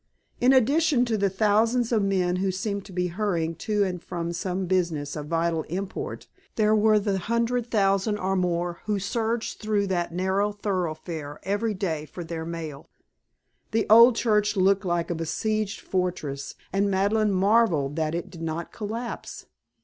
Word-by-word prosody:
In 250 Hz, +2 st, +5 dB
addition 270 Hz, +1 st, +4 dB
to 230 Hz, -2 st, 0 dB
the 200 Hz, -2 st, +1 dB
thousands 220 Hz, +5 st, +2 dB
of 225 Hz, -3 st, +3 dB
men 185 Hz, -2 st, +1 dB
who 190 Hz, +1 st, 0 dB
seemed 200 Hz, +1 st, -3 dB
to 200 Hz, -, -12 dB
be 180 Hz, 0 st, -1 dB
hurrying 170 Hz, -4 st, -1 dB
to 210 Hz, 0 st, 0 dB
and 180 Hz, -3 st, -3 dB
from 170 Hz, -1 st, -4 dB
some 185 Hz, +2 st, -2 dB
business 170 Hz, -6 st, -1 dB
of 150 Hz, -1 st, -5 dB
vital 165 Hz, 0 st, 0 dB
import, 195 Hz, -, -5 dB, 0.3 s
there 215 Hz, -1 st, +3 dB
were 215 Hz, 0 st, +4 dB
the 200 Hz, -2 st, 0 dB
hundred 235 Hz, +3 st, 0 dB
thousand 195 Hz, 0 st, +2 dB
or 190 Hz, 0 st, -1 dB
more 175 Hz, -1 st, -1 dB
who 210 Hz, -1 st, 0 dB
surged 225 Hz, +3 st, -2 dB
through 210 Hz, -2 st, 0 dB
that 175 Hz, -3 st, -1 dB
narrow 190 Hz, +4 st, 0 dB
thoroughfare 165 Hz, -7 st, -3 dB
every 205 Hz, +2 st, -1 dB
day 160 Hz, -6 st, -2 dB
for 175 Hz, +4 st, -7 dB
their 160 Hz, -1 st, -5 dB
mail. 160 Hz, -4 st, -6 dB, 0.8 s
The 225 Hz, 0 st, +1 dB
old 230 Hz, +2 st, +9 dB
church 210 Hz, -3 st, +1 dB
looked 195 Hz, +1 st, +3 dB
like 175 Hz, -1 st, 0 dB
a -, -, +1 dB
besieged 215 Hz, +6 st, -2 dB
fortress 155 Hz, -7 st, -3 dB, 0.2 s
and 200 Hz, +1 st, +2 dB
Madeleine 205 Hz, +2 st, +2 dB
marvelled 190 Hz, -8 st, +2 dB
that 160 Hz, 0 st, 0 dB
it 180 Hz, +2 st, -4 dB
did 170 Hz, -2 st, -10 dB
not 165 Hz, +1 st, -4 dB
collapse. 230 Hz, +3 st, -5 dB
195 Hz, 165 wpm, -26 LUFS, 170-215 Hz, 0.8 s, old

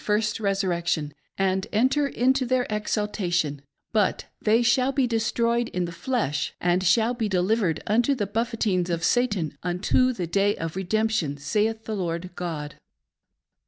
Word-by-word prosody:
1 -, -, -17 dB
37 210 Hz, 0 st, +3 dB
first 210 Hz, -1 st, -1 dB
resurrection, 175 Hz, -7 st, -1 dB, 0.2 s
and 190 Hz, 0 st, 0 dB
enter 260 Hz, +6 st, +2 dB
into 260 Hz, +1 st, +2 dB
their 255 Hz, 0 st, +1 dB
exaltation, 190 Hz, -8 st, -1 dB, 0.3 s
but 210 Hz, -4 st, +1 dB, 0.2 s
they 225 Hz, +2 st, +3 dB
shall 255 Hz, +3 st, +3 dB
be 270 Hz, -1 st, +2 dB
destroyed 235 Hz, 0 st, +1 dB
in 180 Hz, -1 st, -2 dB
the 170 Hz, -, -6 dB
flesh, 170 Hz, -, -2 dB
and 175 Hz, +1 st, +2 dB
shall 220 Hz, +6 st, +3 dB
be 225 Hz, -3 st, -2 dB
delivered 185 Hz, -2 st, +1 dB
unto 240 Hz, +6 st, +2 dB
the 210 Hz, -5 st, -1 dB
buffetings 210 Hz, -4 st, -1 dB
of 165 Hz, -1 st, -1 dB
Satan, 205 Hz, -, +1 dB
unto 185 Hz, +8 st, +2 dB
the 190 Hz, -8 st, -3 dB
day 200 Hz, +4 st, +1 dB
of 165 Hz, 0 st, -5 dB
redemption, 190 Hz, -5 st, 0 dB
saith 220 Hz, +9 st, -1 dB
the 220 Hz, -, -3 dB
Lord 175 Hz, -1 st, -3 dB
God. 155 Hz, -4 st, -5 dB
210 Hz, 155 wpm, -25 LUFS, 175-230 Hz, 0.3 s, 37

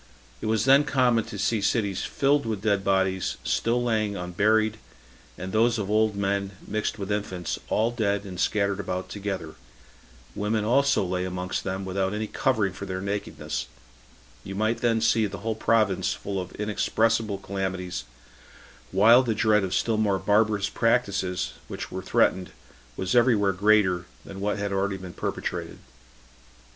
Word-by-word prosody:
It -, -, -3 dB
was 110 Hz, 0 st, +1 dB
then 135 Hz, +2 st, +6 dB
common 125 Hz, -6 st, +2 dB
to 105 Hz, -, -7 dB
see 105 Hz, +2 st, 0 dB
cities 100 Hz, -2 st, 0 dB
filled 140 Hz, -2 st, +1 dB
with 105 Hz, -3 st, -3 dB
dead 100 Hz, -3 st, +1 dB
bodies, 95 Hz, -1 st, +1 dB
still 120 Hz, +1 st, +1 dB
lying 110 Hz, -3 st, 0 dB
unburied, 105 Hz, +5 st, +1 dB, 0.6 s
and 95 Hz, +1 st, -6 dB
those 115 Hz, +2 st, +3 dB
of 105 Hz, -2 st, -3 dB
old 110 Hz, -1 st, +2 dB
men, 100 Hz, 0 st, -1 dB
mixed 110 Hz, +1 st, -2 dB
with 100 Hz, 0 st, -4 dB
infants, 95 Hz, -4 st, -3 dB
all 115 Hz, +2 st, +2 dB
dead, 100 Hz, -4 st, 0 dB
and 90 Hz, -2 st, -7 dB
scattered 100 Hz, -1 st, +1 dB
about 90 Hz, -1 st, -4 dB
together; 100 Hz, -2 st, -4 dB, 0.8 s
women 105 Hz, +1 st, -1 dB
also 140 Hz, -1 st, +3 dB
lay 90 Hz, 0 st, -1 dB
amongst 90 Hz, 0 st, -3 dB
them, 95 Hz, 0 st, -3 dB
without 95 Hz, +1 st, -1 dB
any 110 Hz, +1 st, -2 dB
covering 110 Hz, -5 st, 0 dB
for 100 Hz, -, -7 dB
their 95 Hz, 0 st, -3 dB
nakedness: 100 Hz, +1 st, -4 dB, 0.8 s
you 95 Hz, -, -7 dB
might 110 Hz, +3 st, 0 dB
then 115 Hz, -2 st, +1 dB
see 110 Hz, -1 st, +3 dB
the 100 Hz, 0 st, -7 dB
whole 115 Hz, -, +1 dB
province 110 Hz, -3 st, +1 dB
full 100 Hz, -1 st, -4 dB
of 90 Hz, -, -8 dB
inexpressible 110 Hz, 0 st, 0 dB
calamities, 95 Hz, -7 st, -4 dB, 0.9 s
while 110 Hz, +6 st, +7 dB
the 115 Hz, -4 st, -1 dB
dread 105 Hz, -1 st, +3 dB
of 95 Hz, -, -2 dB
still 115 Hz, -2 st, +1 dB
more 105 Hz, -3 st, +2 dB
barbarous 105 Hz, 0 st, +2 dB
practices 100 Hz, -6 st, 0 dB
which -, -, -6 dB
were -, -, -4 dB
threatened 95 Hz, -1 st, +1 dB, 0.5 s
was 95 Hz, 0 st, -1 dB
every 120 Hz, 0 st, +5 dB
where 100 Hz, -2 st, +2 dB
greater 95 Hz, -2 st, +3 dB, 0.2 s
than 95 Hz, 0 st, -9 dB
what 105 Hz, +1 st, 0 dB
had 100 Hz, 0 st, -2 dB
been 100 Hz, -, 0 dB
already 100 Hz, 0 st, -1 dB
perpetrated. -, -, -4 dB
100 Hz, 160 wpm, -26 LUFS, 95-110 Hz, 0.9 s, while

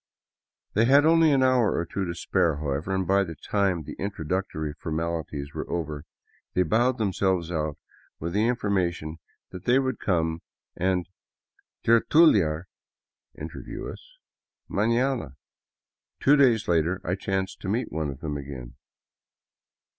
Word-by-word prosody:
They 115 Hz, +3 st, +4 dB
had 140 Hz, +4 st, +6 dB
only 165 Hz, -1 st, +5 dB
an 135 Hz, -2 st, +4 dB
hour 130 Hz, -4 st, +3 dB
or 85 Hz, -, -1 dB
two 95 Hz, +3 st, -3 dB
to 85 Hz, -1 st, -4 dB
spare, 85 Hz, -2 st, +1 dB
how 75 Hz, -1 st, -3 dB
ever, 75 Hz, +8 st, -2 dB
and 95 Hz, -1 st, 0 dB
by 100 Hz, +2 st, +3 dB
the 80 Hz, -4 st, -6 dB
time 95 Hz, -4 st, 0 dB
the -, -, -8 dB
introductory 85 Hz, -4 st, -3 dB
formalities 80 Hz, -3 st, -4 dB
were -, -, -5 dB
over 75 Hz, -3 st, -3 dB, 0.5 s
they 90 Hz, -, +4 dB
bowed 120 Hz, +8 st, +2 dB
themselves 95 Hz, -5 st, 0 dB
out 75 Hz, -3 st, -2 dB, 0.4 s
with 85 Hz, +2 st, -4 dB
the 105 Hz, +3 st, +2 dB
information 90 Hz, -9 st, -1 dB, 0.3 s
that 90 Hz, -1 st, -9 dB
they 125 Hz, +2 st, +4 dB
would 130 Hz, -2 st, 0 dB
come 80 Hz, -3 st, 0 dB, 0.3 s
and 90 Hz, -1 st, 0 dB, 0.8 s
tertu 115 Hz, +8 st, +5 dB
liar 80 Hz, -3 st, 0 dB, 0.7 s
(interview) 300 Hz, -, -7 dB
us -, -, -12 dB, 0.3 s
— -, -, -64 dB
manana. 115 Hz, -, +1 dB, 0.8 s
Two 145 Hz, -, +5 dB
days 125 Hz, -6 st, +4 dB
later 85 Hz, +2 st, +2 dB
I 90 Hz, -, -1 dB
chanced 95 Hz, 0 st, -2 dB
to 95 Hz, -, -5 dB
meet 115 Hz, +5 st, -1 dB
one 80 Hz, -2 st, -2 dB
of 70 Hz, 0 st, -8 dB
them 75 Hz, -2 st, -3 dB
again. 65 Hz, -3 st, -8 dB
95 Hz, 145 wpm, -26 LUFS, 80-115 Hz, 0.8 s, had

